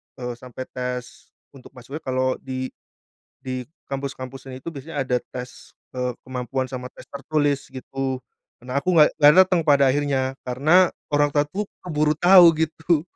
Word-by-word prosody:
eee, 125 -2 -5
sampai 125 +1 -8
tes, 125 -1 -6 0.2
untuk 135 -1 -15
masuknya 130 +5 -8
kalau 130 -2 -1
di, 130 -1 -5 0.7
di 130 -1 -4 0.2
kampus-kampusan 135 -1 -6
itu - - -5
biasanya 150 -1 -5
ada 125 -1 +1 0.2
tes, 125 0 -9 0.2
eee, 125 -1 -1
kemampuan 130 0 -3
sama 125 0 -6
tes - - -14
tertulis 145 0 -1
gitu, 130 0 -4 0.4
nah 125 +3 -4
aku 180 +6 +1
nggak 150 -2 +7
nggak 150 -1 +7
dateng 180 -2 +1
pada 140 -2 +5
akhirnya 135 -1 0
karena 155 +9 +4 0.2
orang 145 0 +4
tua 145 0 +3
tuh 195 +8 -3 0.2
keburu 155 -3 +1
tahu 180 0 +8 0.2
gitu. 160 0 +1
135 Hz, 150 wpm, -23 LUFS, 130-150 Hz, 0.7 s, tahu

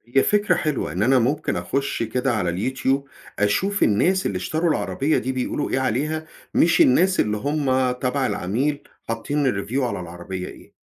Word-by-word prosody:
هي 135 - +6
فكرة 210 0 +2
حلوة 150 - -1
إن 90 +5 -1
أنا 130 +2 +4
ممكن 140 +6 0
أخش 140 -3 -2
كده 125 +3 -1
على 95 -5 0 0.2
الYouTube 135 +1 +1 0.4
أشوف 190 - +1
الناس 180 - +2
اللي 95 - -1
اشتروا 160 - -1
العربية 150 0 0
دي 130 - -1
بيقولوا 130 +3 -2
إيه 130 - 0
عليها، 145 +5 -1 0.3
مش 170 - +4
الناس 185 +9 +4
اللي 105 0 +1
هُم 130 -1 +1
تبع 130 +2 -1
العميل 125 +8 -1 0.2
حاطّين 130 +6 -1
الreview 120 +2 -1
على 120 - -2
العربية 90 +1 -6
إيه. - - -13
130 Hz, 165 wpm, -23 LUFS, 110-150 Hz, 0.4 s, هي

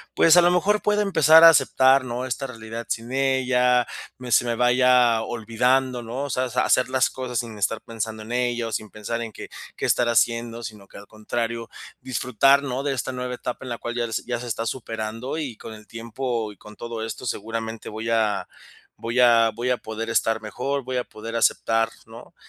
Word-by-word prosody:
pues 165 +1 +6
a - - +9
lo 175 - +5
mejor 195 +4 +2
pueda 210 0 +1
empezar 165 -5 +6
a 165 - +12
aceptar, 135 -2 +4
¿no? 125 +1 -4
Esta 130 +1 -3
realidad 115 -1 -7
sin 115 +2 -4
ella, 130 -2 +2 0.3
me 125 -1 -8
se 120 - +4
me 120 -1 -1
vaya 125 -1 +4
olvidando, 125 +3 0
¿no? 120 +4 -4
O 145 - -4
sea, 130 -1 -1
sa - - 0
hacer 125 -1 +3
las 130 0 +2
cosas 125 -2 -4
sin 115 -3 -6
estar 105 +3 -1
pensando 110 -1 -5
en 110 - -10
ella 120 -1 0
o - - -9
sin 110 -1 -4
pensar 110 +3 -5
en 115 -2 -6
que - - -9 0.3
que - - -3
estará 120 -1 +2
haciendo, 115 0 0
sino 105 -3 -9
que - - -14
al 100 - -12
contrario, 115 +2 -4 0.3
disfrutar, 130 +2 +2
¿no? 135 -1 -3
De 140 -1 0
esta 130 0 -3
nueva 125 0 -4
etapa 125 +1 -6
en - - -7
la 120 - -3
cual 120 +1 -5
ya 120 -1 -1
se - - -2
ya 120 -1 -2
se 125 - -7
está 115 0 -3
superando 115 +3 -4
y 135 -8 -5
con 110 - -9
el 105 -1 -13
tiempo 115 -1 -4
y - - -25
con 105 +3 -14
todo 115 -1 -5
esto, 115 +3 -7
seguramente 115 0 -4
voy 110 +2 -5
a 110 -2 +1 0.5
voy 115 +2 -1
a 115 -2 +5
voy 120 +3 -3
a 125 - +2
poder 110 +1 -6
estar 110 -1 +1
mejor, 135 +6 -3
voy 130 +1 -5
a 125 - -2
poder 115 +2 -8
aceptar, 115 0 +2 0.2
¿no? - - -13
120 Hz, 215 wpm, -23 LUFS, 115-130 Hz, 0.5 s, a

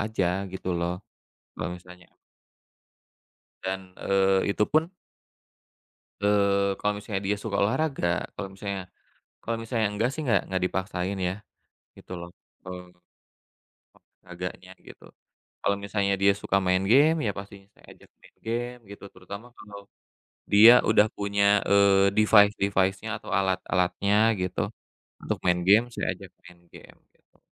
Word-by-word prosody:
aja 100 -2 -1
gitu 95 0 -4
loh. 85 +3 -3 0.5
Kalau - - -4
misalnya 90 0 -16 1.5
dan, 95 0 -5
eee, 95 0 +1
itu 105 - +1
pun 160 - +1 1.3
eee, 100 -1 +2
kalau 105 0 0
misalnya 105 -2 -4
dia 105 - +1
suka 100 -3 -2
olahraga, 135 - 0 0.3
kalau 95 -2 -5
misalnya 100 -1 -5 0.6
kalau 115 - -2
misalnya 115 -2 -1
enggak 110 +4 0
sih 155 - -5
enggak 120 - +3
enggak 95 -1 -1
dipaksain 95 +1 -3
ya 90 - -3 0.6
gitu - - -13
loh, 85 0 -9 0.3
kalau, 90 -1 -9 1.3
olahraganya 90 0 -8 0.2
gitu. - - -14 0.6
Kalau 100 - +1
misalnya 100 -1 0
dia 100 - +6
suka 100 - 0
main 95 +1 +2
game, 155 +5 +5
ya 105 - +1
pastinya 100 0 -10
saya - - -25
ajak - - -22
main - - -21
game 120 +2 -3
gitu, 100 -1 -11
terutama 100 +5 -10
kalau 100 -1 -11 0.7
dia 110 +4 +10 0.2
udah 110 -1 +5
punya, 100 0 0 0.2
eee, 100 -1 +4
device-device-nya 100 -1 +3
atau - - -12
alat-alatnya 95 +1 0 0.3
gitu 90 - -2 0.6
untuk - - -2
main 90 -1 +2
game, 105 +5 +6
saya - - -3
ajak - - -13 0.2
main 85 0 -16
game, - - -15 0.2
gitu. - - -36
100 Hz, 135 wpm, -26 LUFS, 95-105 Hz, 1.5 s, dia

